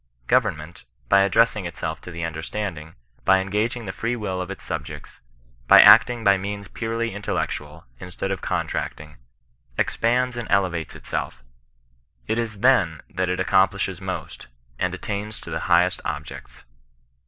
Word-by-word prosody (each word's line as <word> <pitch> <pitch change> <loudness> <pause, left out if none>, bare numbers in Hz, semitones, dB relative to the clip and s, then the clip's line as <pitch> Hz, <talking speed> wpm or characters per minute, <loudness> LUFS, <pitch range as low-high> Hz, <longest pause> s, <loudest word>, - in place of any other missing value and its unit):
Government, 75 +6 0 0.2
by 100 0 +6
addressing 105 -1 +3
itself 85 - -5
to - - -10
the 85 -1 -6
imderstanding, 80 0 -5 0.3
by 95 - +5
engaging 105 +5 -1
the 95 - -4
free 115 +5 -2
will 95 -5 -3
of 90 - -5
its 100 - -7
subjects, - - -7 0.5
by - - +9
acting 120 -2 +7
by 100 -1 +5
means 100 +1 -5
purely 115 +1 -3
intellectual, 80 -6 -4
instead 90 +2 -5
of 95 - -3
contracting, 75 0 -3 0.6
ex - - 0
pands 125 +2 +1
and 120 - -5
elevates 90 -5 0
itself; - - -5 0.8
it 115 - -1
is 110 -4 -4
then 100 - +3
that 90 0 -1
it 90 - -1
accomplishes 95 0 +1
most, 95 -7 -6 0.3
and 90 0 0
attains 105 +2 -5
to - - -9
the - - -3
greatest 90 +1 +3
objects. 75 0 -7
95 Hz, 145 wpm, -23 LUFS, 85-110 Hz, 0.8 s, by